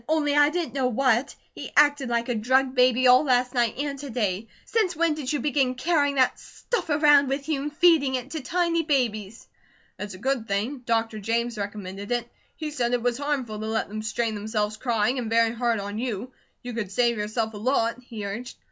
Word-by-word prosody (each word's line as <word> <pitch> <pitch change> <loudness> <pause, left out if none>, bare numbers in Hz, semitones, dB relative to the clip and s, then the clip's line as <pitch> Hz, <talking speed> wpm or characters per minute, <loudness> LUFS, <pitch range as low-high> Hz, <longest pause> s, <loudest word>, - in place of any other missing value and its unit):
"Only 300 -2 +1
I 290 0 +6
didn't 325 -6 -3
know 265 -2 +1
what. 255 +1 +1 0.2
He - - -8
acted 290 -3 +4
like 235 0 0
a 245 - 0
drugged 260 +4 +2
baby 255 0 +3
all 255 +2 +7
last 250 -2 +2
night 240 -3 +1
and 280 0 -3
to 285 0 -7
day. 215 -3 -2 0.2
Since 415 -6 0
when 330 0 +2
did 295 -4 -4
you 295 - 0
begin 265 -2 +1
carrying 285 0 +1
that 260 -2 +2
stuff 480 -8 -4
around 295 -2 +5
with 275 +1 -3
you, 300 -4 -1
and 295 +1 -6
feeding 315 -7 +4
it 255 +2 -5
to 315 - -4
tiny 335 +4 0
babies?" 230 -8 -1 0.5
"It's 205 -2 -6
a - - -10
good 250 +1 -1
thing. 220 +8 -2
Dr. 225 -1 0
James 235 +3 -1
recommended 200 0 -6
it. 240 -1 -1 0.3
He 310 -2 -5
said 245 -4 -1
it 245 -1 0
was 245 +1 0
harmful 270 -7 -2
to 215 - -4
let 220 -2 -1
them 215 +1 -5
strain 220 +1 -2
themselves 210 0 -2
crying, 240 +1 0
and 230 -3 -4
very 230 0 +3
hard 235 -2 0
on 205 +2 -5
you. 245 0 -4 0.3
You 245 0 -6
could 215 -5 -4
save 235 +1 +2
yourself 220 +1 -2
a - - -7
lot," 230 +1 0
he 225 -4 -7
urged. 225 +5 -6
245 Hz, 210 wpm, -25 LUFS, 225-280 Hz, 0.5 s, all